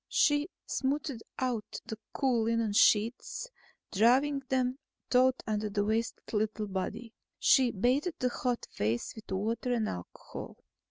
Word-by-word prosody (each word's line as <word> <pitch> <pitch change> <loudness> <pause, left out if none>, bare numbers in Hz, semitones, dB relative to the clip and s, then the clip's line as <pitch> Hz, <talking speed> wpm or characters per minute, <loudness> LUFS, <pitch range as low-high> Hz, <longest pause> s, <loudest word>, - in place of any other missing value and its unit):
She 290 +3 +3 0.2
smoothed 275 -2 -1 0.2
out 245 -5 -2
the 220 -1 -6
cool 250 -5 +1
linen 230 -2 +1
sheets, 225 - +3 0.4
drawing 260 +7 +4
them 255 0 +1 0.3
taut 255 +1 +4
under 215 -1 -1
the 205 0 0
wasted 225 +2 -2
little 215 0 0
body. 200 +4 -4 0.2
She 260 -3 +5
bathed 255 - +1
the 250 - +1
hot 245 -1 -2
face 110 +3 -1
with 220 - -12
water 225 +6 -1
and 225 -3 +1
alcohol. 90 -1 -7
230 Hz, 130 wpm, -31 LUFS, 215-260 Hz, 0.4 s, She